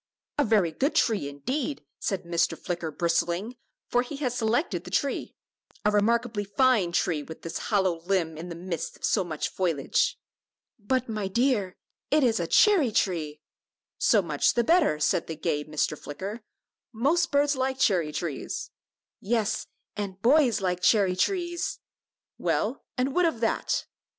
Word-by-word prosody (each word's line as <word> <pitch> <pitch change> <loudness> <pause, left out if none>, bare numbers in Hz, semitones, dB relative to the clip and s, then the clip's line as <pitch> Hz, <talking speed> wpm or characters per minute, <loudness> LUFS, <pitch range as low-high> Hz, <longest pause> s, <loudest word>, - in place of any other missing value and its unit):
"A - - +5
very 205 -8 +3
good 275 - -1
tree, 210 -12 +2
indeed," 260 - -3 0.2
said 195 -3 -2
Mr. 170 -1 0
Flicker, 175 -3 -3
bristling, 170 +7 -1 0.3
for 245 - +2
he 255 +4 -6
had 270 -4 -2
selected 240 +6 0
the - - -9
tree; 280 -2 -1 0.5
"a 210 - +4
remarkably 220 +1 +1
fine 205 -2 +2
tree, 170 -3 +1
with 160 +2 -10
this 165 - -4
hollow 190 -6 +2
limb 175 -3 0
in 165 +3 -7
the 170 - -6
midst 175 0 -5
of - - -4
so 200 - +2
much 160 -4 -3
foliage." 165 -7 0 0.6
"But, 255 +4 0
my 215 -3 -2
dear, 210 -3 +1 0.3
it 300 0 +3
is 230 -3 +3
a 170 - -1
cherry 355 - +5
tree." 155 -7 -1 0.6
"So 210 -4 +4
much 150 -4 +1
the 240 - +3
better," 320 - +3
said 160 - +1
the 160 - -4
gay 150 -2 -1
Mr. 155 0 -1
Flicker; 195 +11 -7 0.5
"most 290 +9 +1
birds 285 0 +3
like 265 0 -1
cherry 175 -11 +2
trees." 155 -2 -4 0.5
"Yes, 220 0 -1 0.3
and 200 -2 -5
boys 255 -3 +4
like 180 -1 -1
cherry 195 -2 +4
trees!" 345 - -1 0.6
"Well, - - -1
and 260 +2 0
what 360 +2 +3
of 265 -9 -2
that?" 225 - 0
205 Hz, 155 wpm, -27 LUFS, 170-255 Hz, 0.6 s, A